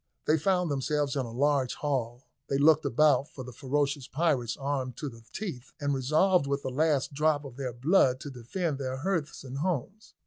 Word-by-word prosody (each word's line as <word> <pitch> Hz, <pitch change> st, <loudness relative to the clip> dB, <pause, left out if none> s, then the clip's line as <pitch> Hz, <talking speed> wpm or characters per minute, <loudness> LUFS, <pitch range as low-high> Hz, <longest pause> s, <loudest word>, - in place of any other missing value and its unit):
They 155 Hz, +1 st, +3 dB
found 180 Hz, 0 st, +1 dB
themselves 145 Hz, +1 st, 0 dB
in 130 Hz, -3 st, -1 dB
a -, -, -8 dB
large 135 Hz, +1 st, +1 dB
hall; 125 Hz, -4 st, -2 dB, 0.3 s
they 135 Hz, -, +1 dB
looked 155 Hz, +2 st, +5 dB
about 145 Hz, +2 st, +3 dB
for 130 Hz, -, -8 dB
the 125 Hz, 0 st, -9 dB
ferocious 140 Hz, +2 st, -1 dB
pirates 135 Hz, -7 st, 0 dB
armed 135 Hz, -3 st, -3 dB
to 150 Hz, -, -4 dB
the 115 Hz, -2 st, -14 dB
teeth, 155 Hz, -, -6 dB
and 145 Hz, -1 st, 0 dB
resolved 155 Hz, +5 st, +3 dB
with 140 Hz, 0 st, -1 dB
the 130 Hz, -, -3 dB
last 145 Hz, 0 st, +1 dB
drop 150 Hz, 0 st, +1 dB
of 130 Hz, -3 st, -9 dB
their 130 Hz, -2 st, -3 dB
blood 130 Hz, +1 st, +3 dB
to 145 Hz, -, -6 dB
defend 140 Hz, +5 st, -3 dB
their 130 Hz, -1 st, -3 dB
hearths 165 Hz, 0 st, -2 dB
and 135 Hz, 0 st, -6 dB
homes. 185 Hz, -, -3 dB
140 Hz, 195 wpm, -29 LUFS, 130-155 Hz, 0.3 s, looked